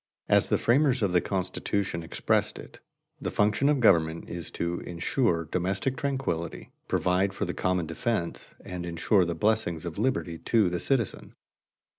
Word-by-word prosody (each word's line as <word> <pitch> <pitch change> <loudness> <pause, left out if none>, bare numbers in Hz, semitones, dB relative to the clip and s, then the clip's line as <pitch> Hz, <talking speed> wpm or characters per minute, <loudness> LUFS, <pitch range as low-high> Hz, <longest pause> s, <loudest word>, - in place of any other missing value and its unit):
As - - +4
the - - +3
framers 130 0 +3
of 100 - +2
the 90 -1 +3
Constitution 95 -1 -2
expressed 80 - 0
it, - - -11 0.4
the - - -2
function 105 +7 +2
of 150 -2 +2
government 80 -8 +3
is 85 -2 -5
to 85 0 -1
insure 85 0 0
domestic 95 - -1
tranquillity, 130 -13 -3 0.2
provide 95 +2 +1
for - - -1
the - - -3
common 90 -2 0
defense, 85 +2 -3
and 90 -1 -5
insure 85 +3 +2
the 85 0 -2
blessings 90 -3 0
of 85 +1 -5
liberty 105 -9 -1
to 110 -6 +2
the 90 - -1
citizen. 125 -2 -1
90 Hz, 155 wpm, -28 LUFS, 85-110 Hz, 0.4 s, As